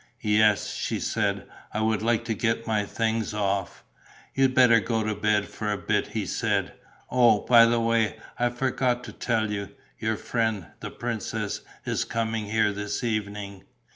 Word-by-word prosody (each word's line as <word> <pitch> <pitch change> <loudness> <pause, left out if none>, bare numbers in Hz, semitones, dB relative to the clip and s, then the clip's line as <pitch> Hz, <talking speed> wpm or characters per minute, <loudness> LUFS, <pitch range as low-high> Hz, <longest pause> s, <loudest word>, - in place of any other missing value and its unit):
"Yes," 105 -1 +3
she - - -2
said. - - -1 0.2
"I 110 - -2
would 110 -1 +1
like 115 +1 +1
to 115 - -1
get 115 +1 -1
my 110 -2 0
things 110 0 -1
off." 100 -3 -2 0.5
"You'd 135 -1 +2
better 125 -3 +6
go 110 +2 -1
to 110 0 -1
bed 105 0 +1
for 105 -1 -4
a 105 - -1
bit," 105 0 0
he 105 -1 -3
said. - - -1 0.4
"Oh, 120 -4 +5
by 115 -1 +7
the 115 0 +2
way, 115 -1 +1 0.2
I 120 0 +3
forgot 125 0 0
to - - -8
tell 110 -3 -1
you: 100 -1 -3 0.3
your 110 -1 -1
friend, 110 -6 -1
the - - -6
princess, - - -3 0.2
is - - 0
coming 115 -1 -2
here 105 -1 +2
this 105 +3 -4
evening!" 100 -3 -3
110 Hz, 170 wpm, -26 LUFS, 105-115 Hz, 0.5 s, by